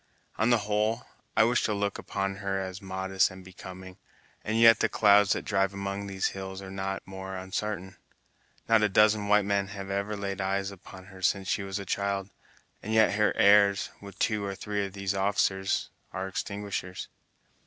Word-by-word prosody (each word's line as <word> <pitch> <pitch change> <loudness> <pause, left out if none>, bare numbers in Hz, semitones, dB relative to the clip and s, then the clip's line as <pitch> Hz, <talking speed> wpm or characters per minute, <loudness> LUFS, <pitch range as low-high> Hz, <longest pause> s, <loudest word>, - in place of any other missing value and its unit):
On 110 +3 +3
the 120 - +5
whole, 110 +3 0 0.3
I - - +7
wish 120 +2 +2
to 105 - 0
look 100 -1 -2
upon 95 0 -3
her 100 -1 -2
as 95 -1 -5
modest 95 0 0
and 95 0 -12
becoming, 95 0 -10 0.5
and 110 +2 0
yet 115 0 +8
the - - +2
clouds 105 -1 +5
that - - -4
drive 95 -1 +1
among 100 0 -4
these 95 -1 -1
hills 95 0 -6
are 95 -1 -8
not 95 0 -4
more 95 0 -7
unsartain. 95 0 -4 0.7
Not 115 -1 +5
a 105 - +3
dozen 105 +1 +4
white 105 -1 +4
men 100 -1 +1
have 100 0 -7
ever 100 +2 -2
laid 100 -1 -3
eyes 95 +1 -1
upon 95 -1 -12
her 95 - -12
since 95 +1 +1
she 100 - 0
was 95 0 -4
a 100 - -5
child, 100 0 -2 0.5
and 110 +2 -2
yet 110 -2 +5
her 105 0 +3
airs, 100 0 +5
with 100 -1 -11
two 110 -1 0
or 100 -1 -3
three 105 +1 -2
of 95 - -13
these 100 -1 -2
officers, 95 -1 0 0.2
are 95 +1 -4
extinguishers!" 100 -1 -4
100 Hz, 185 wpm, -28 LUFS, 95-105 Hz, 0.7 s, yet